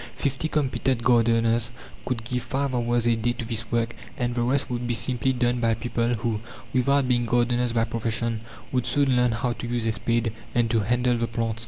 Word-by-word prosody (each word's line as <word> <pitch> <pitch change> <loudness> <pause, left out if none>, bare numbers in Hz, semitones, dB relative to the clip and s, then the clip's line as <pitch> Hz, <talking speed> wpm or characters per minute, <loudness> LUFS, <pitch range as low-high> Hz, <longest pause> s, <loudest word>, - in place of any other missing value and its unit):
Fifty 140 +2 -1
competent 135 -5 0
gardeners 115 -1 +3 0.3
could 120 -3 -2
give 125 +1 -2
five 135 +1 -2
hours 120 -1 +1
a 120 -1 +4
day 115 +2 0
to 120 -1 -6
this 115 0 -2
work, 120 0 0 0.2
and 120 0 -1
the 120 - -1
rest 130 +3 +1
would 120 -1 -3
be 120 - +1
simply 125 +3 +1
done 125 -1 +1
by 115 -1 +2
people 120 +1 -1
who, 110 0 -1 0.3
without 135 +2 +3
being 120 -1 +2
gardeners 120 0 +2
by 115 -1 +2
profession, 115 0 -2 0.3
would 125 -2 0
soon 140 -3 +2
learn 125 -1 +3
how 120 +2 -1
to 120 - -6
use 120 -1 0
a 115 - +2
spade, 115 +1 0 0.2
and 120 -2 +2
to 115 - +3
handle 120 +3 +1
the 115 0 0
plants. 115 -1 -2
120 Hz, 205 wpm, -25 LUFS, 115-125 Hz, 0.3 s, a